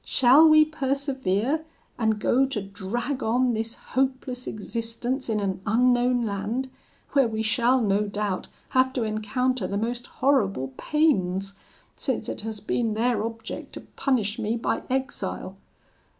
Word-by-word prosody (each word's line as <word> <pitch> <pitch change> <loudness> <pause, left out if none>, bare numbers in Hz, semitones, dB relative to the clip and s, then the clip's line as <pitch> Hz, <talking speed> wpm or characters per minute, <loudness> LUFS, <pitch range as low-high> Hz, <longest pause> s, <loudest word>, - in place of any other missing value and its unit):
Shall 270 +5 +6
we 310 0 +7
persevere, 275 -3 -1 0.4
and 220 -2 +1
go 265 +5 +3
to 265 -5 -3
drag 210 +7 -4
on 245 +2 +2
this 225 +1 -3 0.2
hopeless 260 -1 -1
existence 230 +4 -3
in 215 -1 +1
an 190 -2 -2
unknown 245 +2 +3
land, 220 +6 -2 0.4
where 275 -4 +4
we 220 0 -2
shall, 240 +3 +3
no 210 -2 +1
doubt, 205 -2 -2 0.2
have 260 0 +3
to 250 - -1
encounter 215 +1 -1
the 200 - -2
most 240 +3 -2
horrible 195 - +1
pains, 195 - +1 0.4
since - - -2
it - - -4
has 220 0 -5
been 220 +1 -1
their 230 -1 +1
object 225 0 -6
to - - -7
punish 235 -5 0
me 225 +1 -1
by 230 - -1
exile? 265 +2 -3
235 Hz, 140 wpm, -25 LUFS, 210-260 Hz, 0.4 s, we